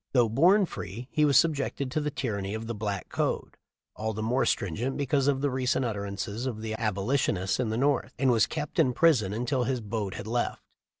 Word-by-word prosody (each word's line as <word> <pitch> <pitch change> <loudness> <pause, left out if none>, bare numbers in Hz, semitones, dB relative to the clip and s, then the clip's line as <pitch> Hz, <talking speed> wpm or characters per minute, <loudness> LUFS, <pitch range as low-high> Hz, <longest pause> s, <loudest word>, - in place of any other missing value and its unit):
Though 120 -4 +4
born 180 - +5
free 115 - -7
he 150 - +3
was 140 -3 +5
subjected 140 -4 +1
to 155 +2 0
the 150 - -1
tyranny 110 -7 -3
of 110 +1 -5
the 115 - -3
"black 105 -3 -3
code," - - -2 0.4
all 110 +1 -2
the 110 +1 -4
more 125 +4 +1
stringent 110 +9 -1
because 140 -1 +1
of 135 -2 +2
the 145 -1 +1
recent 130 0 0
utterances 100 +2 -3
of 110 -4 -4
the 110 0 -3
Abolitionists 100 -2 0
in 125 -3 0
the 110 - -1
North, 135 -1 +1
and 135 -2 +3
was 115 -3 +4
kept 150 +2 -4
in 130 -6 +4
prison 130 - +3
until 125 +4 0
his 130 0 0
boat 105 -3 -4
had - - -6
left. 120 +2 -2
120 Hz, 205 wpm, -28 LUFS, 110-135 Hz, 0.4 s, born